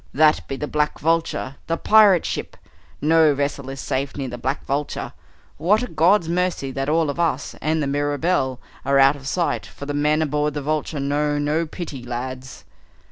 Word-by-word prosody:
"That 155 +1 +4
be 135 - -3
the 150 - -3
Black 150 0 0
Vulture, 160 -4 -1
the 165 - 0
pirate 210 -5 +5
ship. - - -4 0.4
No 155 -1 +4
vessel 140 -1 -2
is 135 0 -6
safe 135 +2 -3
near 135 -2 -3
the 120 - -6
Black 130 +4 -2
Vulture! 140 +2 -3 0.4
What 210 +7 +2
a - - -3
God's 170 +2 +3
mercy 175 -5 -1
that 135 +1 -2
all 160 -1 +2
of 155 - -9
us, 155 -5 0
and 155 0 0
the - - 0
Mirabelle, 145 -1 0 0.2
are 140 0 +2
out 135 +1 +6
of 135 -1 -10
sight, 170 +3 -1
for 140 - -10
the 145 - -3
men 150 +2 +2
aboard 150 0 -1
the 145 - -2
Vulture 155 0 -2
know 145 +1 0
no 150 +3 0
pity, 150 -5 -7
lads!" 125 +1 -6
145 Hz, 190 wpm, -22 LUFS, 135-160 Hz, 0.4 s, out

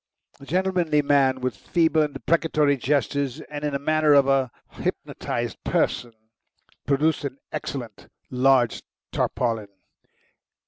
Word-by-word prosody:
The 140 - -13
gentlemanly 180 -4 +1
man, 135 -2 +3
with 125 -3 -2
feeble 160 - +1
and 150 -2 -1
deprecatory 155 -3 +2
gestures, 140 +1 -1
and 145 0 -5
in 150 -1 -1
the - - +1
manner 155 +1 +3
of 140 -1 +5
a 135 -2 +2 0.2
hypnotised - - -4
person, 120 -2 0 0.7
produced 145 +3 +2
an 140 -1 -4
excellent 135 -5 -6 0.2
large 130 -2 +3 0.3
tarpaulin. 115 -4 -1
140 Hz, 120 wpm, -24 LUFS, 130-155 Hz, 0.7 s, of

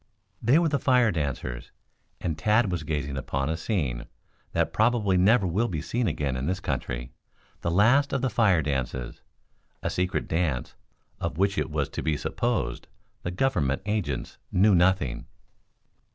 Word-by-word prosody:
They 120 +6 +4
were 170 -1 +3
the 140 -2 +1
fire 125 -4 +4
dancers 70 -6 -3 0.5
and 80 -3 -2
Tad 105 +3 +2
was 90 -2 -1
gazing 75 -3 -3
upon 70 +2 -2
a 80 - 0
scene 80 - -2 0.4
that - - 0
probably 110 -4 +2
never 100 +4 +4
will 100 +7 +1
be 85 -7 -3
seen 115 +9 -1
again 75 -4 -1
in 65 +3 -2
this 95 +2 -1
country - - -3 0.5
the - - -1
last 120 +11 +4
of 135 -2 -1
the 130 - +2
fire 95 -7 +3
dances 65 -3 -3 0.6
a - - -1
secret 90 +1 -1
dance 80 -7 -1 0.5
of 75 - -3
which 100 +2 +2
it - - -1
was 75 -2 -1
to - - -4
be 80 -2 0
supposed 115 - -2 0.3
the - - -3
Government 90 - 0
agents 100 - -2
knew 100 +3 +5
nothing. 90 -7 +2
90 Hz, 160 wpm, -27 LUFS, 70-110 Hz, 0.6 s, knew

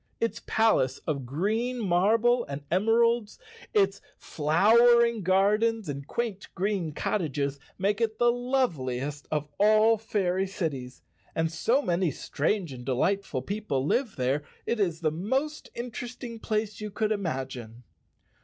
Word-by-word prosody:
Its 230 - -1
palace 215 - +2
of 140 -5 -2
green 220 - -1
marble 220 +5 +3
and 140 +1 -6
emeralds, 225 +3 +2 0.3
its 415 -4 +2 0.2
flowering 235 +9 +4
gardens 205 +3 +2
and 140 -1 -5
quaint 225 -5 -3
green 190 -4 -1
cottages 145 -4 -2 0.2
make 200 +3 0
it 220 -1 0
the 240 0 +4
loveliest 150 - -1
of 150 -1 -1
all 215 +2 +5
fairy 195 -3 0
cities, 140 -10 -4 0.3
and 160 0 0
so 235 - +1
many 175 -3 +1
strange 160 +4 -2
and 125 -1 -9
delightful 135 +3 0
people 175 -8 -2
live 245 - 0
there 130 +3 0 0.2
it 235 - -1
is 175 -5 0
the 155 -2 +1
most 260 - -2
interest¬ 240 +1 -6
ing 230 -2 -6
place 215 -1 -2
you 210 - -4
could 215 +1 -1
imagine. 130 - -4
200 Hz, 135 wpm, -27 LUFS, 150-225 Hz, 0.3 s, all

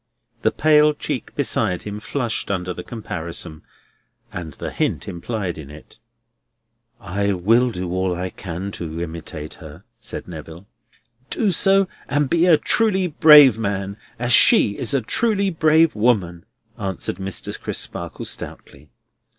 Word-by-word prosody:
The - - +3
pale 150 -1 +4
cheek - - -4
beside 90 -1 0
him 105 0 -6
flushed 120 0 -2
under 90 -2 -2
the - - -7
comparison, 85 -7 -6 0.7
and 80 -4 -6
the - - -6
hint 110 - -1
implied 95 -1 -4
in 70 -3 -10
it. 75 +8 -14 1.0
"I 100 0 -1
will 115 +7 +3
do 90 -5 -5
all 95 0 0
I 90 +1 -4
can 95 +2 -6
to 85 -3 -6
imitate 80 -2 -6
her," 80 +3 -11 0.2
said - - -6
Neville. 80 +1 -9 0.6
"Do 210 -4 +1
so, 195 +2 +3 0.2
and 145 -1 0
be 170 +1 +3
a 165 -3 +7
truly 200 -2 +1
brave 150 - +7
man, 100 -2 -2 0.2
as 120 0 0
she 100 -4 +5
is 140 - -1
a 135 - +2
truly 200 - 0
brave 160 0 +4
woman," 100 -6 +1 0.3
answered 95 -3 -3
Mr. 95 -1 -5
Crisparkle - - -4
stoutly. 70 +1 -7
100 Hz, 140 wpm, -21 LUFS, 85-145 Hz, 1.0 s, a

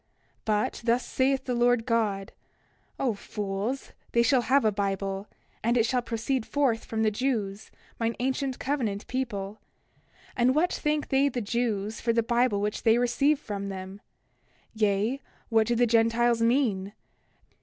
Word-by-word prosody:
29:4 - - -46 0.4
But 210 -1 0
thus 240 +1 +2
saith 265 0 +1
the 250 - -1
Lord 240 -1 +3
God: 210 -5 0 0.7
O 255 -4 +1
fools, 205 +5 -4 0.2
they 235 - +4
shall 255 +1 +4
have 265 +1 +3
a 215 - +4
Bible; 195 0 -2 0.4
and 235 +2 +2
it 225 - +4
shall 250 +1 +1
proceed 240 +2 -2
forth 250 -4 0
from 220 -1 -1
the 215 - +3
Jews, 215 -4 -2 0.3
mine 230 0 0
ancient 265 +1 -1
covenant 230 -8 -2
people. 215 -6 -4 0.7
And 255 +2 +3
what 340 +4 +2
thank 300 0 -1
they 275 +1 +3
the 250 - -3
Jews 220 -2 -2
for 230 0 +1
the 230 0 +2
Bible 235 -3 +2
which 210 0 -2
they 225 0 +4
receive 275 +5 +2
from 200 -5 -5
them? 190 +1 -7 0.7
Yea, 215 +4 +1 0.3
what 225 -1 +3
do 240 - +1
the 240 +1 +4
Gentiles 230 +1 +3
mean? 230 -5 +1
230 Hz, 155 wpm, -27 LUFS, 210-255 Hz, 0.7 s, they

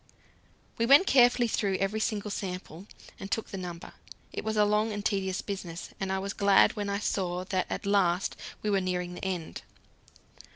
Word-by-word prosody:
'" - - -35
We 230 - +2
went 280 +8 +8
carefully 245 -5 +5
through 200 -3 0
every 195 +3 -1
single 210 -1 -2
sample, 185 -1 -6 0.3
and 195 - -7
took 225 - -2
the - - -6
number. 175 -1 -7 0.4
It - - -4
was 220 0 -2
a 210 - +5
long 210 +1 +1
and 205 0 -5
tedious 190 -2 -1
business, 185 -3 -6
and 190 -1 -2
I 190 - 0
was 195 +1 -3
glad 200 -1 +4
when 205 -2 -3
I 200 - 0
saw 185 -3 -1
that 185 -1 -1
at - - -4
last 195 -3 +2 0.3
we 210 - 0
were 195 -1 +2
nearing 180 -1 -2
the - - -9
end. 180 -4 -4
195 Hz, 195 wpm, -29 LUFS, 185-210 Hz, 0.4 s, went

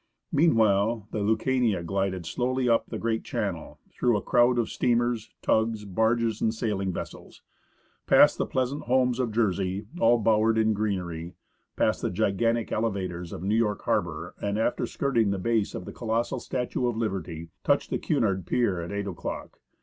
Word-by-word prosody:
Meanwhile 110 -7 +3
the 110 - -2
Lticatiia 110 -2 +1
glided 95 -1 -1
slowly 125 +9 -1
up 115 -1 +2
the - - -5
great 115 -1 -1
channel, 95 -7 -4
through 120 -3 +1
a - - -3
crowd 120 +1 +3
of 115 -2 +1
steamers, 120 -2 0
tugs, 110 -1 +1
barges, 110 +2 +1
and 110 - +2
sailing 105 -4 -2
vessels; - - -8 0.6
past - - +6
the - - 0
pleasant 130 +2 -2
homes 125 0 +2
of 125 -3 0
Jersey, 100 -2 0
all 120 +1 +5
bowered 110 0 +3
in 110 0 +3
greenery; 90 -5 -3 0.4
past - - +1
the - - 0
gigantic 110 +4 0
elevators 95 -6 -2
of 85 - -7
New 100 +2 0
York 110 -2 +1
harbour, 85 +1 -1
and, 100 0 -1
after 120 +2 0
skirting 120 -7 +1
the 100 - 0
base 110 +2 0
of 90 - -6
the - - -8
colossal 115 0 -1
statue 125 0 -2
of 120 -2 -2
Liberty, 90 -7 -3
touched - - +1
the - - 0
Cunard 95 -5 0
pier 100 -8 +1
at 85 - -6
8 100 0 -2
o'clock. 95 -5 -6
110 Hz, 165 wpm, -27 LUFS, 95-115 Hz, 0.6 s, past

